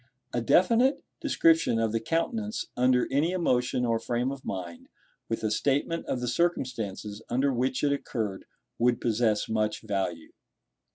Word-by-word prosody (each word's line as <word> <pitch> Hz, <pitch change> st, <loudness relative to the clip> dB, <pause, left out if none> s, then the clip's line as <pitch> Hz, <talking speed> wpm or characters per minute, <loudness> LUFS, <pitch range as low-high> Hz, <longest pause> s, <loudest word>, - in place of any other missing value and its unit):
A 120 Hz, -, 0 dB
definite 230 Hz, -, +3 dB, 0.2 s
description 330 Hz, -, +3 dB
of 115 Hz, -1 st, +1 dB
the 115 Hz, -, 0 dB
countenance 210 Hz, -, -2 dB
under 125 Hz, 0 st, +3 dB
any 155 Hz, +6 st, +2 dB
emotion 125 Hz, -8 st, +1 dB
or 115 Hz, -1 st, +1 dB
frame 120 Hz, +3 st, -1 dB
of 140 Hz, -1 st, -7 dB
mind, 90 Hz, -3 st, -6 dB, 0.4 s
with 115 Hz, -, -2 dB
a 110 Hz, -, 0 dB
statement 145 Hz, +7 st, 0 dB
of 125 Hz, -, -2 dB
the 125 Hz, -, -2 dB
circumstances 115 Hz, -, -2 dB
under 135 Hz, +3 st, +1 dB
which 130 Hz, +2 st, -1 dB
it 145 Hz, -1 st, +3 dB
occurred, 110 Hz, -8 st, -3 dB, 0.3 s
would 120 Hz, 0 st, +3 dB
possess 110 Hz, -2 st, +1 dB
much 110 Hz, 0 st, -1 dB
value. 95 Hz, -6 st, -3 dB
125 Hz, 150 wpm, -28 LUFS, 110-140 Hz, 0.4 s, definite